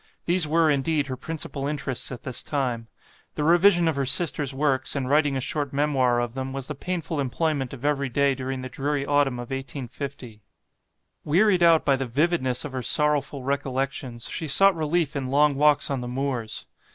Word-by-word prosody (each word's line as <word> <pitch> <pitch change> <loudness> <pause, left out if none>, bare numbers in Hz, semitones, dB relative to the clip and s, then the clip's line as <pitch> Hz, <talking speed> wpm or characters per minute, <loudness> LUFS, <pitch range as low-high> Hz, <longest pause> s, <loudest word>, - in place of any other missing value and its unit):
These 175 -2 +3
were, 160 0 +3
indeed, 145 +1 +1
her 130 -2 -4
principal 140 0 -5
interests 140 -4 -3
at 125 -3 -8
this 130 -3 -4
time; 125 -6 -2 0.5
the 150 - -2
revision 175 +2 +5
of 160 - +1
her 140 -1 -1
sister's 145 -1 +1
works, 135 -1 0
and 135 -2 -2
writing 145 0 +2
a - - -1
short 140 +1 -3
memoir 135 -4 +2
of 120 -1 -2
them, 130 0 -4
was 135 -1 -4
the 150 - -5
painful 165 +1 -4
employment 140 0 -1
of 135 0 -8
every 140 -2 0
day 140 +2 +2
during 130 0 -4
the 130 - -5
dreary 140 +2 -2
autumn 145 -2 +2
of 120 +1 -7
1850. 135 -3 -6 0.8
Wearied 185 +4 +3
out 165 -2 +5
by 140 - +4
the 135 -1 -3
vividness 135 -1 0
of 145 - -6
her 130 -1 -4
sorrowful 145 0 0
recollections, 135 -2 -3
she 160 - -4
sought 195 +6 +5
relief 160 -1 0
in 135 -2 -2
long 145 +2 +3
walks 150 +1 +3
on 135 -2 -1
the 125 - -5
moors. 125 -3 -3
140 Hz, 190 wpm, -25 LUFS, 130-150 Hz, 0.8 s, revision